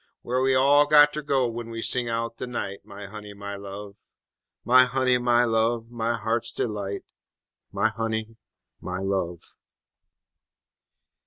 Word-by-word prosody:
Whar 125 +1 0
we 130 0 +3
all 145 +3 +5
got 150 0 +7
ter 150 - -3
go 140 -3 +1
w'en 115 0 -5
we 115 0 -5
sing 125 -2 0
out 115 0 -3
de - - -5
night, 100 -5 -5
My 100 +1 -10
honey, 105 0 -9
my 100 0 -6
love! 100 +1 -9 0.7
_My 130 +1 +6
honey, 125 -1 +2
my 120 0 +3
love, 115 0 0
my 120 0 -1
heart's 115 +1 -1
delight 100 -3 -3 0.7
My 100 +3 +1
honey, 110 0 -3 0.5
my 90 0 -4
love! 95 -3 -2
115 Hz, 145 wpm, -25 LUFS, 100-125 Hz, 0.7 s, got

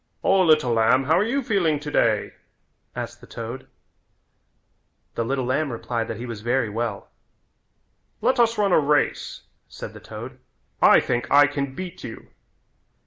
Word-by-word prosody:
"O, 195 0 +4
little 155 -8 +4
lamb, 115 +4 +3
how 160 +6 +3
are - - +3
you 265 +5 -1
feeling 175 -10 +1
today?" 115 -8 0 0.6
asked - - -6
the - - -14
toad. 115 +3 -7 1.5
The 115 - -1
little 130 +2 -1
lamb 140 +3 0
replied 115 0 -3
that 115 - -5
he 120 - -6
was 115 -4 -7
very 120 0 0
well. 115 +1 -4 1.1
"Let 260 0 +1
us 230 -1 +3
run 205 -2 +2
a - - +5
race," 150 0 0 0.2
said - - -9
the - - -11
toad, - - -9 0.4
"I - - +7
think 120 0 -2
I 145 0 +7
can 140 -2 -3
beat 185 -1 -7
you." 115 - -9
140 Hz, 155 wpm, -23 LUFS, 115-170 Hz, 1.5 s, I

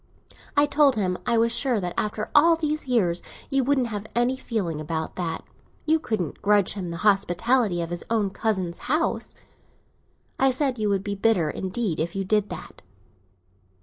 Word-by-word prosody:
I 285 - +6
told 290 -2 +4
him 185 -4 0
I 235 -1 +3
was 230 +1 +3
sure 245 -2 +1
that 180 -2 -3
after 215 0 -2
all 330 +3 +6
these 305 -2 -2
years 180 -9 +1 0.3
you 270 -1 +2
couldn't 265 -1 +2
have 210 -2 -5
any 240 +2 +2
feeling 195 -12 -3
about 160 +1 -4
that; 170 -3 -3 0.4
you 320 +1 +3
couldn't 215 - -3
grudge 205 -2 +3
him 185 -4 -5
the 170 - -5
hospitality 200 0 +2
of 165 - -6
his 175 - -4
own 215 -4 +1
cousin's 190 -6 -2
house. 310 +4 0 1.0
I 270 - +5
said 260 -2 +1
you 210 -1 +1
would 195 -1 0
be 205 -1 -3
bitter 195 -6 +2
indeed 190 -2 -2
if 170 +3 -2
you 195 0 -2
did 210 +1 +1
that. - - -9
215 Hz, 175 wpm, -25 LUFS, 180-255 Hz, 1.0 s, I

